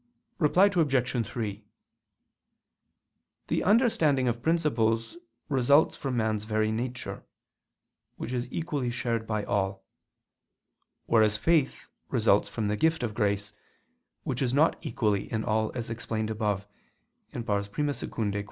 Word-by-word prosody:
Reply 180 +4 +5
Obj. 135 - +1
3: 105 -3 -4 1.9
The - - +1
understanding 165 - +3
of 120 0 -1
principles 120 - +1 0.3
results 140 +2 +4
from 130 -3 -3
man's 110 -2 0
very 110 0 0
nature, 125 +3 -4 0.9
which 120 - -5
is 125 0 -3
equally 150 -7 -2
shared 115 -2 -2
by 105 -1 -1
all: 95 -1 -1 1.2
whereas 110 -2 +3
faith 155 +3 +1 0.2
results - - +3
from 110 -3 -2
the 105 - 0
gift 160 -1 +2
of 110 -3 -2
grace, 105 -1 -1 0.7
which 130 -1 -3
is 130 -1 +1
not 155 +3 +4
equally 105 - -1
in 110 -1 -1
all, 110 0 0
as 115 -2 -4
explained 110 -1 -3
above 105 -2 -1 0.7
(I - - -7
II, 115 +6 -2
Q. 110 -3 -1
115 Hz, 125 wpm, -28 LUFS, 110-140 Hz, 1.9 s, Reply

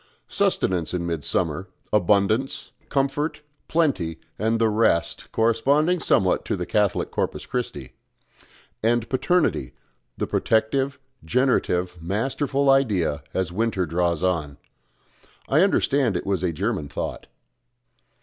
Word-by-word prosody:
Sustenance 90 -1 0
in 85 -1 -2
midsummer, 85 +2 -2 0.3
abundance, 105 +6 +2 0.2
comfort, 140 +3 -1 0.3
plenty, 125 - 0 0.2
and 110 +2 +1
the 115 0 +3
rest, 105 -6 +1
corresponding 140 +10 +2
somewhat 95 - +2
to - - -1
the - - -3
Catholic 105 -2 0
Corpus - - -2
Christi; 95 - -4 0.9
and 115 +1 +1
Paternity, 135 - +1 0.4
the - - -1
protective, 135 +5 +1 0.3
generative, 90 -5 +1
masterful 135 - -1
idea, 95 - +2
as 95 -3 0
winter 100 -1 0
draws 85 +1 0
on.... 75 -6 -1 0.9
I 150 +4 +4
understand 140 - +2
it - - -5
was 95 -3 0
a 90 -2 0
German 95 -1 -2
thought." - - -5
105 Hz, 110 wpm, -24 LUFS, 90-135 Hz, 0.9 s, I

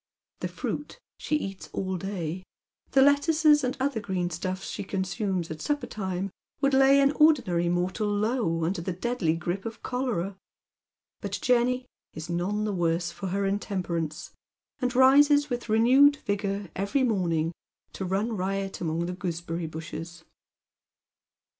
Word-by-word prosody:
The - - -2
fruit - - -5 0.2
she 305 - -1
eats 195 -10 -4
all 190 -1 -2
day, 180 -2 -4 0.5
the 270 - +5
lettuces 295 +1 +4
and 255 0 -1
other 265 -3 0
green 185 -4 -2
stufEs 185 +2 -4
she - - -4
consumes 190 -2 -2
at 155 -1 -6
supper 290 -3 -1
time, 190 -3 -3 0.3
would 275 -1 +2
lay 270 +1 +6
an 275 0 +4
ordinary 250 - +3
mortal 180 +4 0
low, 205 -5 0
under 170 +2 -1
the 185 +2 -3
deadly 185 -4 0
grip 175 +4 -3
of 225 0 -7
cholera; 235 -7 -2 0.9
but - - -3
Jenny 250 +1 +2 0.3
is 160 +2 -6
none 190 +5 -1
the 210 -1 -1
worse 170 -1 0
for 195 - -6
her 195 +2 -1
intemperance, 180 -6 -2 0.5
and 250 -1 -1
rises 285 +2 +6
with 240 -1 -3
renewed 255 +6 +6
vigour 200 -1 -2
every 200 +8 0
morning 170 -8 +1 0.4
to - - -5
run 200 +5 -1
riot 195 0 -2
among 165 0 -1
the 180 - -3
goosebeny 170 -2 -4
bushes. 160 +1 -7
195 Hz, 145 wpm, -27 LUFS, 175-250 Hz, 0.9 s, lay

